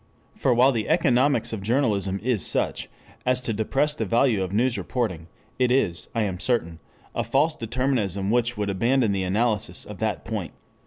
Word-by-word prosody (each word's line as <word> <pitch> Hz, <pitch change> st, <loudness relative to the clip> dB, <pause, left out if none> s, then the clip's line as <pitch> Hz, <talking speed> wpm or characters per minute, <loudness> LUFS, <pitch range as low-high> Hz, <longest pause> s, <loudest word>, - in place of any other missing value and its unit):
For 130 Hz, -, +1 dB
while 125 Hz, +3 st, +5 dB
the 115 Hz, -4 st, -2 dB
economics 140 Hz, -7 st, +2 dB
of 110 Hz, -, -4 dB
journalism 100 Hz, -4 st, 0 dB
is 120 Hz, -5 st, +1 dB
such -, -, -1 dB, 0.3 s
as 125 Hz, 0 st, +2 dB
to 120 Hz, -3 st, -2 dB
depress 135 Hz, +8 st, 0 dB
the 115 Hz, -, -3 dB
value 115 Hz, 0 st, +2 dB
of 95 Hz, -1 st, -2 dB
news 120 Hz, +4 st, +1 dB
reporting, 100 Hz, -13 st, -3 dB, 0.3 s
it 125 Hz, -1 st, +3 dB
is, 100 Hz, -9 st, +1 dB
I 115 Hz, -, +2 dB
am 95 Hz, -3 st, -3 dB
certain, 85 Hz, -9 st, -1 dB, 0.3 s
a -, -, -1 dB
false 150 Hz, +4 st, +2 dB
determinism 115 Hz, -, -1 dB
which 120 Hz, 0 st, +1 dB
would 105 Hz, -1 st, -1 dB
abandon 115 Hz, +3 st, +2 dB
the 100 Hz, -1 st, 0 dB
analysis 105 Hz, +3 st, 0 dB
at -, -, -9 dB
that -, -, -2 dB
point. -, -, -4 dB
115 Hz, 175 wpm, -25 LUFS, 100-130 Hz, 0.3 s, while